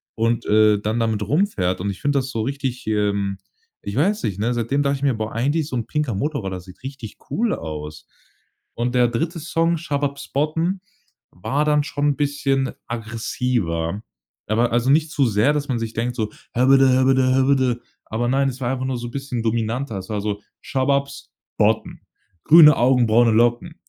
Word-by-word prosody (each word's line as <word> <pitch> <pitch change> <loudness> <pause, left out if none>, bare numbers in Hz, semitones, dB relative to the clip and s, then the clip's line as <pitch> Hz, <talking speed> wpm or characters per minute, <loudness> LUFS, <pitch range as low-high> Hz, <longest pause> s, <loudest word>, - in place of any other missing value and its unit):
und, 115 +1 0
äh, 105 -1 +4
dann 110 +3 -1
damit 110 -2 0
rumfährt. 105 - 0
Und 100 - -2
ich 95 - -10
finde 145 0 +1
das 130 0 -4
so 115 - -2
richtig, 130 0 -4
ähm 100 -2 0 0.5
ich 100 - -5
weiß 200 - +1
nicht, 100 -2 -2
ne, 115 +4 0
seitdem 120 +5 0
dachte 140 0 +1
ich 135 - -9
mir: 140 -2 +3
„Boah, 110 0 -4
eigentlich 145 +6 0
so - - -4
'n 115 - -2
pinker 150 -6 -1
Motorroller 100 - -3
sieht 90 +1 -15
richtig 130 -5 -8
cool 230 +1 +1
aus.“ 75 -1 -7 0.7
Und 120 +2 -2
der 125 -1 +4
3. 165 +9 -2
Song 165 +2 0
„Shababs 140 -3 -3
botten“ 165 +6 0 0.5
war 135 - -1
dann 150 -1 +3
schon 145 -1 -1
'n 145 - 0
bisschen 140 -2 0 0.2
aggressiver. 110 -6 -2 0.5
Aber 115 +3 +1
also 120 +2 +1
nicht 155 +1 +2
zu 140 -4 +2
sehr, 110 +6 +2
dass 145 -1 -2
man 125 - 0
sich 115 -1 -4
denkt 120 +2 -2
so 110 -3 -2 0.2
„Häbbäddä 135 +2 +5
häbbäddä 130 0 +3
häbbäddä“, 130 -2 +2 0.3
aber 115 +2 -1
nein, 135 +1 +2
es 130 0 -7
war 120 0 0
einfach 130 0 -3
nur 130 -1 -2
so 120 0 -6
bisschen 135 -3 -4
dominanter. 115 +1 -1
Es 95 - -10
war 105 -1 -2
so: 105 0 -3 0.2
„Shababs 140 +1 -1 0.3
botten. - - +1 0.4
Grüne 150 -2 +8
Augen, 125 0 +3
braune 115 +2 +4
Locken. 120 +9 +1
125 Hz, 185 wpm, -21 LUFS, 110-140 Hz, 0.7 s, Grüne